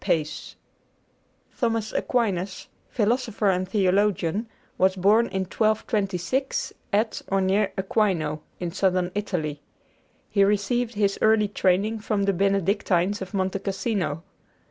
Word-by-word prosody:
PACE 155 -1 -2 1.0
Thomas 230 -3 -1
Aquinas, 195 -6 -1 0.2
philosopher 225 -2 +1
and 185 0 -1
theologian, 200 0 +1 0.3
was 190 0 +3
born 210 +5 +4
in 190 - -2
1226, 215 +4 -1 0.2
at 215 +2 0
or 195 - +1
near 195 +2 +2
Aquino, 190 -6 0 0.2
in 175 -2 -3
Southern 185 -1 +1
Italy. 160 -8 -3 0.7
He 200 - +4
received 215 +4 +1
his 200 -1 +1
early 220 -1 +4
training 200 +2 +1
from 205 -1 -1
the 195 0 +2
Benedictines 195 0 +1
of 190 +2 -6
Monte 190 0 0
Cassino. 195 -5 -2
200 Hz, 115 wpm, -25 LUFS, 185-215 Hz, 1.0 s, born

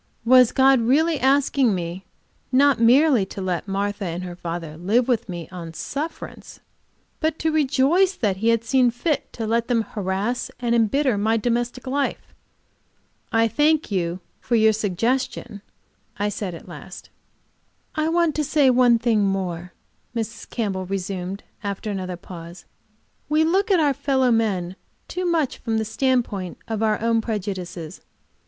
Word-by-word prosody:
Was 250 0 +6
God 265 -1 +4
really 300 +6 +2
asking 270 -4 +3
me 175 +2 -5 0.5
not 275 -1 +4
merely 250 0 +5
to - - -8
let 185 0 -2
Martha 200 +1 -2
and 175 +1 -4
her 180 -1 -6
father 170 -3 -5
live 210 +9 +1
with 235 -4 0
me 175 -2 -6
on 165 -3 -8
sufferance, 305 - -6 0.6
but 315 -1 0
to 320 - 0
rejoice 310 +6 +3
that 200 -5 0
He 220 +4 -1
had 230 -1 +3
seen 255 +1 +3
fit 275 +5 -2
to 225 - -4
let 230 +1 0
them 235 -3 +2
harass 205 +4 -2
and 240 -2 0
embitter 235 +1 +2
my 220 +2 +2
domestic 240 +2 -1
life? 275 +2 -2 1.0
"I 225 0 +3
thank 300 +2 +2
you 180 -1 -1 0.2
for 240 - -1
the 220 0 +5
suggestion," 220 +1 -2 0.6
I 205 +1 0
said, 200 -3 -4
at - - -12
last. - - -11 0.8
"I 310 0 0
want 335 -1 +2
to 305 - +1
say 285 -2 +3
one 245 -1 +5
thing 225 -2 +2
more," 180 -3 -2 0.4
Mrs. 225 -1 -5
Campbell 195 -5 -2
resumed, 190 0 -4 0.2
after 200 +1 -3
another 185 -2 -4
pause. 170 -1 -11 0.6
"We 305 +1 +3
look 385 +7 +2
at 380 -3 +4
our 290 -3 +3
fellow 265 -2 +1
men 195 -5 0 0.3
too 365 0 -3
much 325 -6 0
from 225 -2 -1
the 220 - 0
standpoint 220 -6 -1
of 220 -1 -3
our 215 -1 +2
own 230 0 +2
prejudices. 190 -7 -5
225 Hz, 155 wpm, -23 LUFS, 195-265 Hz, 1.0 s, Was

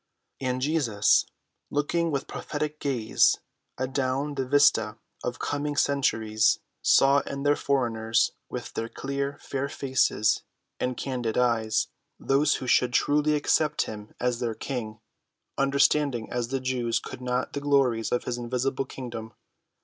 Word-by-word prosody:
And 130 -1 -1
Jesus, 130 -9 +3 0.4
looking 165 +4 0
with 140 -3 -1
prophetic 150 0 -4
gaze 125 -7 +2 0.4
adown 130 +2 -1
the 135 -2 -2
vista 125 -6 +4 0.3
of 125 - -3
coming 145 0 -2
centuries, 115 -7 +2 0.2
saw 140 +1 +5
in 140 0 -5
these 145 0 +3
foreigners, 115 -5 +1 0.2
with - - -6
their 115 0 -3
clear, 140 +2 -3
fair 140 0 -3
faces 130 -6 +1 0.4
and 125 -1 -1
candid 125 -4 -2
eyes, 115 -3 +2 0.3
those 140 +2 +2
who 130 - -5
should 125 0 +3
truly 150 +2 +3
accept 150 +1 +2
him 105 0 -9
as 125 -1 0
their 115 -2 -2
king, 115 -5 -5 0.6
understanding 140 -3 +2
as 120 -1 -1
the 135 +2 -2
Jews 125 -2 0
could - - -9
not 125 0 -2
the 140 - -3
glories 135 -6 +2
of 125 - +1
his 120 -1 -3
invisible 130 +2 -1
kingdom. 120 -4 -7
130 Hz, 135 wpm, -27 LUFS, 120-140 Hz, 0.6 s, saw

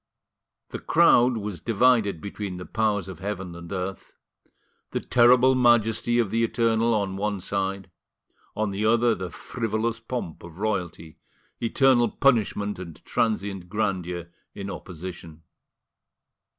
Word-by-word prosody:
The - - -6
crowd 120 0 +4
was 100 -6 -5
divided 115 -6 +2
between 100 -2 -5
the 90 - -7
powers 105 -4 0
of 95 - -8
heaven 95 -2 -5
and 85 0 -10
earth: 95 0 -5 0.7
the - - -2
terrible 125 +2 +5
majesty 120 -2 +3
of 115 -5 +1
the 115 +1 +1
Eternal 115 0 +2
on 100 -2 -1
one 105 0 -1
side, 95 0 -3 0.6
on 110 -1 -1
the 100 +2 -3
other 115 +2 +3
the 95 -4 -5
frivolous 115 +2 -3
pomp 115 -8 -5
of 85 -1 -12
royalty—eternal 110 - -1
punishment 105 -6 +1
and 85 -4 -9
transient 100 -5 -1
grandeur 90 -4 -2 0.2
in 100 0 -5
opposition. 85 -3 -9
105 Hz, 125 wpm, -25 LUFS, 95-115 Hz, 0.7 s, terrible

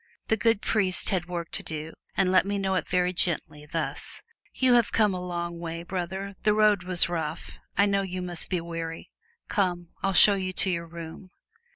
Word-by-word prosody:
The 220 - +4
good 225 -1 +1
priest 195 -4 +1
had 180 -3 -1
work 170 -2 -5
to - - -1
do, 155 0 -5 0.2
and 185 -1 +3
let 185 - +5
me 200 +1 -2
know 195 -1 0
it 185 - -1
very 180 0 +1
gently, 155 -4 -1
thus: 165 +1 -3 0.3
"You 255 -1 +3
have 240 -2 +4
come 210 -3 +3
a 180 -1 -4
long 170 -1 -4
way, 165 0 -5
brother, 190 +2 -4
the 210 -1 +3
road 210 -3 +4
was 175 -3 +3
rough 165 -2 -4 0.2
I 200 - +5
know 200 -1 +2
you 185 -1 -4
must 175 -2 +1
be 180 -2 0
weary. 165 -1 -6 0.4
Come, 175 -4 -1
I'll 195 - 0
show 205 +3 +8
you 185 -1 -2
to 190 - +2
your 170 -1 -3
room." 170 +2 -9
180 Hz, 200 wpm, -27 LUFS, 170-195 Hz, 0.4 s, show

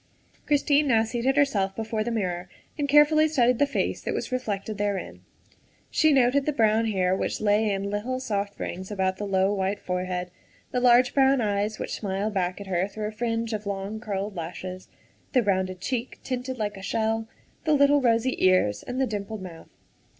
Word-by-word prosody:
Christine 290 0 +3
now 225 -4 +4
seated 240 +4 -1
herself 200 -10 +2
before 220 -1 -2
the 235 - -3
mirror 180 -6 -2 0.3
and 285 -2 -2
carefully 300 +2 +6
studied 250 -5 +2
the 285 - +4
face - - -1
that - - -3
was - - -4
reflected 215 -4 -3
therein. 205 -2 -3 0.7
She 315 -1 +4
noted 270 +1 +3
the 300 - +1
brown 225 -2 +3
hair 185 -3 +1
which - - -2
lay 210 +1 +2
in 200 0 -2
little, 240 +5 -2
soft 205 -5 -3
rings 185 +2 -5
about 190 -2 -1
the 205 - -4
low, 190 +1 +2
white 195 0 -1
forehead; 180 0 -3 0.4
the 250 - 0
large 245 0 +5
brown 270 -1 +4
eyes 210 -1 0
which - - -5
smiled 200 +1 -2
back 180 -1 -1
at 200 - -7
her 185 0 0
through 210 +1 -4
a - - -8
fringe 230 0 -2
of 210 -1 -4
long, 200 +2 -4
curled 205 -2 -4
lashes; 180 +2 -6 0.5
the 250 -3 +4
rounded 185 -2 0
cheek, 245 +5 -3
tinted 255 0 -4
like 210 -2 -3
a - - -9
shell; 225 +2 -1 0.4
the 310 - +3
little, 285 0 +5
rosy 240 +1 +2
ears 185 - +3
and 250 +1 -5
the 265 - +3
dimpled 210 -2 -5
mouth. 170 -3 -10
215 Hz, 185 wpm, -26 LUFS, 195-250 Hz, 0.7 s, carefully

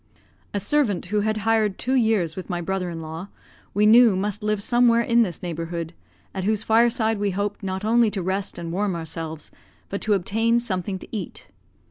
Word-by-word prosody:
A 205 - -1
servant 205 -3 +1
who 210 - +3
had 215 +1 0
hired 220 -3 +2
two 255 - -2
years 220 -10 +2
with 185 - -7
my 175 -2 -2
brother 180 +1 -2
in 165 -1 -6
law, 160 +4 -7 0.5
we 210 +1 +4
knew 225 -1 +7
must 200 +2 -1
live 210 -1 -1
somewhere 240 0 +4
in 235 0 +3
this 180 -7 -2
neighbourhood, 165 0 -4 0.4
at 190 - -3
whose 215 +2 +1
fireside 225 -1 +2
we 205 0 0
hoped 205 +2 -3
not 190 0 -4
only 230 0 +4
to 200 -3 -4
rest 190 +1 -2
and 170 -1 -5
warm 195 +1 -1
ourselves, 160 -1 -6 0.4
but 200 - -4
to 215 - +1
obtain 225 +5 +1
something 190 -5 -2
to - - -12
eat. 195 -5 -7
200 Hz, 190 wpm, -23 LUFS, 180-220 Hz, 0.5 s, knew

